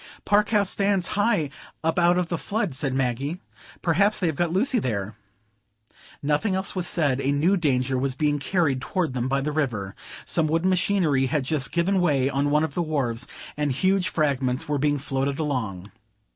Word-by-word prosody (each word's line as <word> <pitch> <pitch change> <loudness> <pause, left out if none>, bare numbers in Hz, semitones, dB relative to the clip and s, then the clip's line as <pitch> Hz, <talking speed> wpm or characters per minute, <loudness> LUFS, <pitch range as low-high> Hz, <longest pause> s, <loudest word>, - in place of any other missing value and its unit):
"Park 205 0 +3
House 205 -3 +3
stands 195 -2 +1
high 205 -9 +1 0.3
up 165 +3 +1
out 175 +1 +4
of 180 -2 -1
the 170 - -1
flood," 205 - -2
said 135 +1 0
Maggie. 135 +5 -1 0.4
"Perhaps 200 +5 +3
they 185 - -1
have 160 -3 0
got 170 +2 0
Lucy 240 +8 +2
there." 105 - -3 1.1
Nothing 150 +8 +1
else 190 +1 0
was 180 -2 0
said; 140 -5 +1
a 140 - +1
new 160 +8 +2
danger 130 -6 0
was 135 0 -1
being 145 0 +1
carried 140 -4 0
toward 170 -2 -2
them 125 -1 -1
by 135 +1 0
the 150 +2 -2
river. 115 -11 -2 0.3
Some 165 -2 +1
wooden 165 +4 +1
machinery 170 -8 +2
had 145 +1 0
just 135 0 0
given 185 +2 +1
way 140 -6 +2
on 140 +1 0
one 150 +1 +3
of 160 - -2
the 175 - -1
wharves, 135 -7 -1 0.3
and 150 -1 -1
huge 185 +7 +1
fragments 135 -4 0
were 145 -1 -1
being 145 +1 +1
floated 135 0 -2
along. 110 - -3
150 Hz, 185 wpm, -24 LUFS, 135-180 Hz, 1.1 s, out